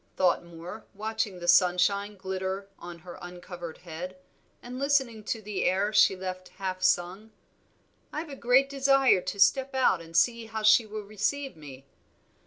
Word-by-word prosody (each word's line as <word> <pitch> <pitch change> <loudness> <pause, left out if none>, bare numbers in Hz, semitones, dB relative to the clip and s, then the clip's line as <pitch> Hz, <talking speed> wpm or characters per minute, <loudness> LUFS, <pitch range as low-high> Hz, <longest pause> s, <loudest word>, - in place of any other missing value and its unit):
thought 180 -2 +2
Moor, 170 +4 -10
watching 215 -2 -3
the 175 0 -7
sunshine 185 +3 +3
glitter 190 +1 -4
on 175 -1 -9
her 175 +1 -11
uncovered 175 -1 -8
head, 180 +2 -8 0.4
and 250 +1 -8
listening 265 -6 +1
to 220 +1 -4
the 205 -1 -3
air 195 +3 +1
she 210 -2 +5
left 185 0 -6
half 185 -1 -4
sung. 185 +4 0 0.8
"I've 310 +1 -5
a 280 - -7
great 255 +2 +3
desire 275 -6 +3
to 185 +3 -5
step 265 +7 +3
out 250 -9 +3
and 165 0 -5
see 230 +4 +2
how 220 -1 -5
she 215 +1 +6
will 215 0 -6
receive 215 +7 -2
me. 140 -4 -12
195 Hz, 160 wpm, -28 LUFS, 180-225 Hz, 0.8 s, she